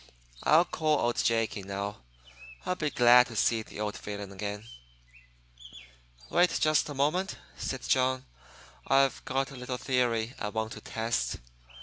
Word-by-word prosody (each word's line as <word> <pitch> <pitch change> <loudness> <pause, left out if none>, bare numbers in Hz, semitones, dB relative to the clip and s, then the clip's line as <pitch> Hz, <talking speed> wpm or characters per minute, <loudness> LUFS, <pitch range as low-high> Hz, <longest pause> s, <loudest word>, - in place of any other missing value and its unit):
I'll 165 +3 +5
call 155 -3 +1
old 120 -3 0
Jake 115 -1 +1
in, 95 -1 -8
now. 100 +1 -4 0.7
I'll 180 - +1
be 155 -4 -2
glad 125 -1 +6
to 115 - -9
see 115 +1 +2
the 110 - -11
old 105 -1 -2
villain 100 -1 -6
again." 100 +1 -5 1.7
"Wait 175 -1 +3
just 155 -1 +2
a 145 - -6
moment," 160 +8 0 0.2
said 130 -2 -4
John. 130 0 +2 0.6
"I've 135 0 +3
got 135 +1 -1
a - - -9
little 125 0 -4
theory 120 -3 0
I 105 - -2
want 110 0 -3
to - - -8
test. 110 - -2
125 Hz, 150 wpm, -29 LUFS, 105-135 Hz, 1.7 s, glad